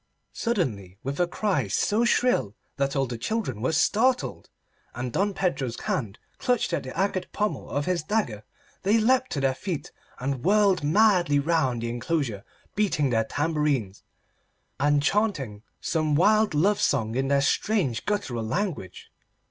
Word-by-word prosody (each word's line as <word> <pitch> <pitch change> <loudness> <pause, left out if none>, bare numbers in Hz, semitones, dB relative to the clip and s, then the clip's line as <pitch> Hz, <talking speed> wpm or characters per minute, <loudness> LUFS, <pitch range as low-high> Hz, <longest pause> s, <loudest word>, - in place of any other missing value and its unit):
Suddenly, 110 - -2
with 140 +2 -4
a 175 - +3
cry 180 - 0
so 210 - +1
shrill 240 - +2 0.2
that 140 0 0
all 135 -1 +2
the 120 -2 -6
children 160 - -2
were 130 - +1
startled 220 - +1 0.5
and 125 0 -4
Don 200 0 0
Pedro's 135 -10 -1
hand 135 - -2 0.2
clutched 245 -8 0
at - - 0
the 130 +3 -8
agate 190 -1 -1
pommel 210 0 -2
of 145 +1 -1
his 180 -2 0
dagger, 155 - -1 0.4
they 205 +3 +3
leapt 255 +3 +2
to 145 - -1
their 135 -1 +2
feet 165 +3 -5 0.3
and 130 0 -3
whirled 200 -3 +3
madly 175 -2 +4
round 140 -6 +1
the 115 - -2
enclosure 120 -3 -2 0.3
beating 165 -10 +1
their 115 -1 +2
tambourines, 145 - -1 0.8
and 145 +1 +3
chaunting 150 - 0 0.2
some 155 -2 0
wild 210 +2 +4
love 200 +7 +2
song 115 -6 +1
in 135 +2 0
their 140 0 +3
strange 140 - +1
guttural 135 - -1
language. 145 - -4
150 Hz, 150 wpm, -26 LUFS, 125-205 Hz, 0.8 s, madly